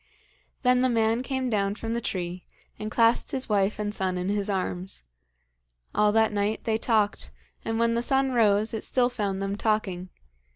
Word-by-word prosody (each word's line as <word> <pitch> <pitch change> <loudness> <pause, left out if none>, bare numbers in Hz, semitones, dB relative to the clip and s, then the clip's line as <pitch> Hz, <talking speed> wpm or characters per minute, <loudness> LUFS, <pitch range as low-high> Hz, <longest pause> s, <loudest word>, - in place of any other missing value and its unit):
Then 250 0 +4
the 255 0 +3
man 225 0 +2
came 260 -1 -2
down 200 -1 0
from 225 +1 -4
the 235 - -1
tree, 180 -3 -4 0.4
and 215 - -4
clasped 230 +1 +3
his 265 -1 -2
wife 205 -1 +1
and 210 -1 -3
son 185 -3 -1
in 180 +1 -2
his 205 0 -1
arms. 185 - -3 0.9
All 210 0 +3
that 220 -1 +3
night 205 +1 -1
they 220 -1 0
talked, 215 -3 +1 0.3
and 225 0 -2
when 230 0 +2
the 235 - +1
sun 270 +1 +2
rose 215 -2 +3
it 220 - -3
still 250 -1 +2
found 200 -5 -2
them 195 0 -2
talking. 200 -4 -1
215 Hz, 180 wpm, -26 LUFS, 200-235 Hz, 0.9 s, Then